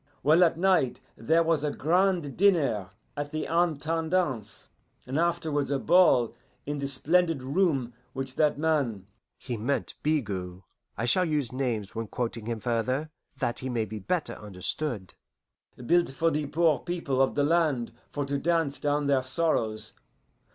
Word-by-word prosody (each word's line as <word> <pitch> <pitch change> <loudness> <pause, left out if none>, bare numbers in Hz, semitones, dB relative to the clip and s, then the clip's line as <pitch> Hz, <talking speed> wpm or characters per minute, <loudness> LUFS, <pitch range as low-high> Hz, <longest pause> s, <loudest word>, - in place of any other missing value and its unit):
Well, 160 +5 +6
at 165 -2 +3
night 180 -8 +2 0.2
there 160 +9 +2
was 160 -3 +1
a 150 - +1
grand 170 -1 +1
dinner 150 - +2 0.3
at 145 0 -3
the 155 - -2
Intendance, 165 - -1 0.4
and 130 +4 -2
afterwards 160 -4 0
a 140 - +1
ball 135 -7 +4 0.3
in 145 0 -3
the 140 - -2
splendid 160 +2 +1
room 135 -4 +1 0.2
which 135 -1 -4
that 150 0 +2
man" 140 -11 0 0.3
(he 120 -3 -5
meant 125 +6 -1
Bigot: 100 - -2 0.4
I 115 - -1
shall 180 +10 +4
use 150 -7 -1
names 120 -6 -2
when 115 0 -4
quoting 115 -1 -4
him 115 -1 -2
further, 125 +7 -1 0.3
that 120 -4 -1
he 130 - -4
may 115 -3 0
be 110 +1 -7
better 175 - -2
understood) 105 +2 -3 0.7
"built 175 +5 +3
for 165 +5 +1
the 150 -1 -1
poor 160 -2 +2
people 165 -7 -1
of 135 - +2
the 145 - +2
land 150 -7 +1 0.2
for 145 -1 -2
to 140 0 -2
dance 165 -3 0
down 145 0 0
their 140 -2 +3
sorrows. 125 -7 -1
145 Hz, 155 wpm, -28 LUFS, 120-165 Hz, 0.7 s, Well